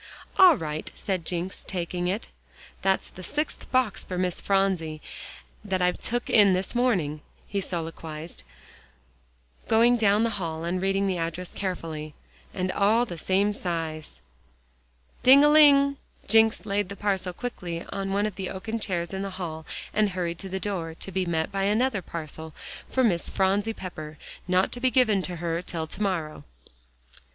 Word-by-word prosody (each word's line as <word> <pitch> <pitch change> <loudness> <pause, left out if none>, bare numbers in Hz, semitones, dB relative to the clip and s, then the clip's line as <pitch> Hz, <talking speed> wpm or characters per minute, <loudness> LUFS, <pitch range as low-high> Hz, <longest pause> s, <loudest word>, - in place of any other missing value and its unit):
"All 365 -6 +9
right," 155 -1 -4
said 185 -4 -3
Jencks, 180 +2 -3
taking 175 -1 -3
it. 200 +6 -2 0.5
"That's 190 0 +1
the 185 - -11
sixth 295 - -4
box 255 -6 +1
for 180 - -5
Miss 180 -1 0
Phronsie 190 -6 +1 0.6
that 190 -3 -1
I've 180 0 +1
took 240 +1 -2
in 205 -4 +6
this 185 +1 -1
morning," 185 -12 +1 0.3
he 200 0 -2
soliloquized, 165 -2 -6 1.3
going 235 +2 +5
down 210 -1 +4
the 230 - +1
hall 160 -1 -3
and 180 +2 -1
reading 195 +1 +1
the 185 -3 0
address 165 +2 -4
carefully. 160 -5 -4 0.4
"And 185 -1 -2
all 220 +5 +3
the 175 -8 -7
same 195 +5 +2
size." 160 - -4 1.0
"Ding 270 +3 +8
a 295 - +6
ling," 280 -2 +6 0.3
Jencks 225 +1 +4
laid 200 -2 0
the 200 - -6
parcel 195 -3 -1
quickly 175 -5 -5
on 195 -1 -3
one 200 +1 +1
of 210 -3 -4
the 190 -2 -3
oaken 220 +4 -4
chairs 175 -4 -2
in 190 - -2
the 195 - -3
hall, 165 -4 -6 0.3
and 210 -1 +3
hurried 175 -2 -3
to 195 - -7
the 190 +1 -3
door, 175 -5 -3
to 195 - -5
be 185 0 -1
met 160 -2 0
by 195 0 0
another 220 +1 +2
parcel 160 -1 -7 0.3
for 260 - +2
"Miss 175 -8 +2
Phronsie 200 +3 +1
Pepper: 155 -6 -8 0.3
not 185 +1 +2
to 245 - -5
be 255 +1 +3
given 235 -7 +3
to 180 -1 -5
her 170 0 -2
till 165 -3 -4
to 175 +6 -7
morrow." 175 -7 -1
190 Hz, 165 wpm, -26 LUFS, 170-210 Hz, 1.3 s, All